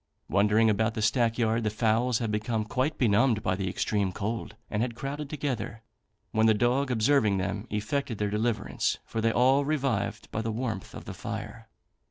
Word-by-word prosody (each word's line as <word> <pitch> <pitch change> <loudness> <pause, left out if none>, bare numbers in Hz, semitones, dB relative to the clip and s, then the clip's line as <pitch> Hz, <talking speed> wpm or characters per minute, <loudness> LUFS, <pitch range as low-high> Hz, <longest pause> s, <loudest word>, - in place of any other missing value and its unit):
Wandering 105 +3 +3
about 110 +1 +1
the 110 - -2
stack 115 0 +2
yard, 115 -1 +1
the 105 - +1
fowls 115 +2 +1
had 115 -3 -2
become 110 +1 -1
quite 130 +7 -1
benumbed 115 -1 +3
by 90 - +1
the 95 0 -2
extreme 100 0 0
cold, 110 +5 -4
and 105 - -2
had 120 -1 -1
crowded 140 +3 -5
together, 135 -7 -3 0.5
when 110 0 +3
the 110 - +5
dog 125 +5 +2
observing 115 -3 +3
them, 100 +4 -3
effected 110 +3 -2
their 105 0 -1
deliverance, 110 +1 0
for 115 - -3
they 115 0 +3
all 130 +4 +4
revived 125 -8 -1
by 110 - -2
the 115 0 -2
warmth 110 -4 -4
of - - -9
the 100 - -6
fire. 110 +2 -6
110 Hz, 185 wpm, -28 LUFS, 105-125 Hz, 0.5 s, the